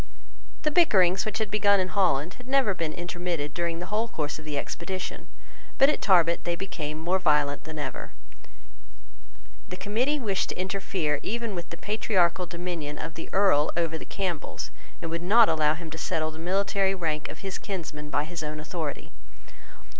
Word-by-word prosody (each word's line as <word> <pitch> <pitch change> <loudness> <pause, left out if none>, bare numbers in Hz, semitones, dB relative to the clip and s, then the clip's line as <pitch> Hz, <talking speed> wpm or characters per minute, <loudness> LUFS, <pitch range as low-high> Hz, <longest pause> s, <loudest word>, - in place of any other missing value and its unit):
The 305 - +2
bickerings 190 - +5
which 215 - -2
had 220 -2 -2
begun 200 -1 +4
in 185 0 0
Holland 180 -4 +2
had 250 0 -14
never 265 -6 +3
been 165 -4 -2
intermitted 175 -3 -3
during 170 -1 -1
the 175 - -4
whole 220 +2 +2
course 150 -8 -3
of 155 - -11
the 150 -2 -3
expedition; 185 +6 -4 0.5
but 275 - +7
at 300 - 0
Tarbet 170 -4 +4
they 175 - 0
became 155 -5 -4
more 175 +4 +1
violent 150 -4 +2
than 160 0 -7
ever. 145 -3 -4 1.6
The 180 - -5
Committee 235 +10 +1
wished 200 -6 0
to - - -5
interfere 185 -5 -1
even 230 -1 -2
with 175 -2 -5
the 170 - -7
patriarchal 185 -4 +1
dominion 170 -4 -4
of 165 - -5
the 165 - -7
Earl 190 -7 +4
over 165 -2 +1
the 160 - -5
Campbells, 180 -6 -3 0.3
and 165 - -3
would 165 0 -2
not 215 +6 +6
allow 155 -1 +3
him 165 -1 -8
to 160 - -6
settle 155 0 -1
the 155 - -10
military 195 +2 +1
rank 155 -4 -2
of 160 - -9
his 190 - -3
kinsmen 155 -6 -5
by 145 - +1
his 165 +2 -5
own 155 0 -4
authority. 155 -1 -4
175 Hz, 180 wpm, -27 LUFS, 155-195 Hz, 1.6 s, but